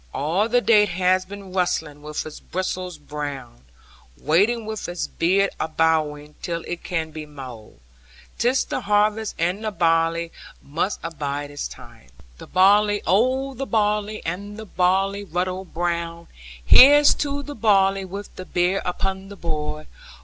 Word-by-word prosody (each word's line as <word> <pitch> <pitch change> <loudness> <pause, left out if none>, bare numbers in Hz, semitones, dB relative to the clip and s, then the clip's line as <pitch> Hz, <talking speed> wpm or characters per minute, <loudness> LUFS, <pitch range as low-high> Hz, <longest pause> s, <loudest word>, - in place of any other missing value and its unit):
All 175 +10 0
the 245 +1 +3
day 225 -3 +5
it 210 - +1
has 185 +1 +2
been 195 -1 -10
rustling, 160 -5 -1
with 150 0 -5
its 155 - -8
bristles 185 -1 -4
brown, 145 - -7 0.5
Waiting 205 - +2
with 220 -3 -5
its 175 0 -3
beard 195 +4 +1
abowing, 155 -2 0
till 170 -1 -3
it 175 - -5
can 160 -3 -3
be 155 -1 -8
mown! 130 -7 -11 0.6
'Tis 250 +3 +2
the - - -3
harvest 210 +1 +1
and 180 +6 -1
the 215 - 0
barley 165 -2 +1 0.3
must 165 +8 -2
abide 145 -3 -4
its 145 - -4
time. - - -14
(Chorus) - - -24
The - - -10
barley, 205 +3 +4
oh 260 +7 +2
the 265 +2 -5
barley, 210 -1 0
and 200 +5 -5
the 220 - -7
barley 195 +2 +1
ruddy 185 +1 -3
brown! 170 0 -2 0.4
Here's 290 - +8
to 285 -1 -2
the 290 - -7
barley, 195 -5 +3
with 195 +2 -8
the 185 - -7
beer 180 +2 +1
upon 190 +2 -3
the 200 - -9
board! 155 -3 -4
185 Hz, 155 wpm, -23 LUFS, 160-205 Hz, 0.6 s, Here's